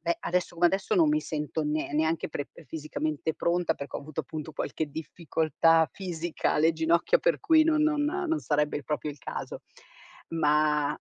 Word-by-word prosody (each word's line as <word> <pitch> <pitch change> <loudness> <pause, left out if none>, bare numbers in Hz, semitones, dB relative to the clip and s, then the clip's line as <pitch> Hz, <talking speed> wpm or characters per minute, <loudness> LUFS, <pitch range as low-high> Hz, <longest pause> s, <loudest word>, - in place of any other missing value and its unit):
beh, 170 0 -1
adesso 180 0 -1
come 175 +1 +4
adesso, 195 - -1
non 330 -6 +5
mi 305 +1 +2
sento 155 - -3
ne 150 -1 -2
neanche 160 +2 0
pre 145 -2 -5
ehm, 160 - -15
fisicamente 155 +1 -3
pronta 170 -1 +1
perché 140 - -6
ho - - -6
avuto, 155 +1 -5
appunto, 155 +1 -7
qualche 155 +1 -3
difficoltà 160 0 +1
fisica 175 -3 -2
alle 160 +2 +3
ginocchia, 165 - +2
per - - +1
cui 315 -1 +5
no 315 -1 +3
non 300 -1 +2
non 325 +1 0
sarebbe 150 - 0
proprio 150 0 -2
il 145 - -11
caso. - - -6 0.7
Ma 150 -2 +2
160 Hz, 175 wpm, -28 LUFS, 150-180 Hz, 0.7 s, non